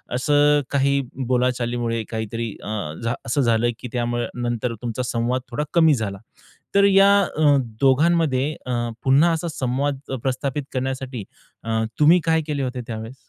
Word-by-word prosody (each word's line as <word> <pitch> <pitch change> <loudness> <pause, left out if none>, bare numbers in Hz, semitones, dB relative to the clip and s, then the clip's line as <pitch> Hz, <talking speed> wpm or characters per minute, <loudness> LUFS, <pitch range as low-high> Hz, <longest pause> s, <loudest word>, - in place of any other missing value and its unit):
असं 145 +2 +3
काही 140 0 +2 0.3
बोलाचालीमुळे 120 -2 0
काहीतरी 110 0 -4
अ, 105 -8 -4
झा 115 +1 0
असं 130 +5 0
झालं 115 -1 +2
की 125 - -6
त्यामुळे 120 -1 -1
नंतर 120 0 -2
तुमचा 120 +1 -3
संवाद 120 +1 -1
थोडा 150 +5 -1
कमी 160 -3 +5
झाला. 100 -4 -3 0.6
तर 200 - +6
या 200 0 +6 0.3
अ, 145 -2 +5 0.2
दोघांमध्ये 145 0 +3
अ, 125 - -4 0.3
पुन्हा 140 +6 +4
असा 165 +1 -2
संवाद 135 +1 -1
अ, 135 - -2
प्रस्थापित 135 +2 -2
करण्यासाठी 130 -2 -3 0.4
अ, 110 0 -1 0.2
तुम्ही 160 +4 +6
काय 160 -1 +2
केले 145 -3 -2
होते 125 -1 -3
त्यावेळेस? 115 +1 -6
130 Hz, 150 wpm, -22 LUFS, 120-145 Hz, 0.6 s, तर